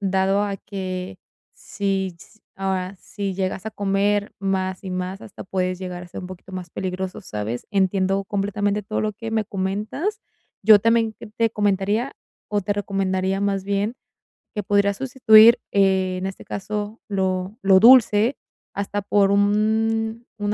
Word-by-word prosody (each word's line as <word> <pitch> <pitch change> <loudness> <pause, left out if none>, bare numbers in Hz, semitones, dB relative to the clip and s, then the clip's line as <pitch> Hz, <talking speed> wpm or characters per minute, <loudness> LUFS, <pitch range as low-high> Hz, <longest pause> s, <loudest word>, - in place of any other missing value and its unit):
dado 195 +1 +1
a 200 -1 -2
que 185 -2 -5 0.4
si, 195 -2 -2
s 215 - -18 0.2
ah, 190 -1 -2
si 200 -2 -5
llegas 190 0 -3
a 220 - -4
comer 205 0 0
más 190 -1 -2
y 190 - -5
más, 185 +2 -4
hasta 205 - -10
puedes 185 -1 -2
llegar 180 -1 -6
a 180 - -11
ser - - -7
un 180 - -7
poquito 185 +1 -11
más 185 -2 -6
peligroso, 185 +2 -4
¿sabes? 110 - -5
Entiendo 195 -1 +1
completamente 205 +1 -1
todo 215 +2 -3
lo 215 -1 -1
que 225 +2 -6
me 220 -1 0
comentas. 210 - -3 0.4
Yo 210 0 +8
también 230 0 +2
qué - - -9
te 225 +2 0
comentaría, 205 +4 0 0.4
o 205 -1 0
te 205 +2 -1
recomendaría, 195 -1 -1
más 195 -1 0
bien, 200 +4 -1 0.6
que 210 - -2
pudieras 200 0 +2
sustituir, 235 -3 +6
eh, 190 -2 +2
en 185 - -4
este 195 0 -6
caso, 210 +2 -5
lo 190 0 -1
lo 190 -1 +6
dulce 230 0 +6 0.4
hasta 205 +1 -3
por 200 0 +3
un 220 +3 +1
un 205 0 0
200 Hz, 160 wpm, -22 LUFS, 190-210 Hz, 0.6 s, Yo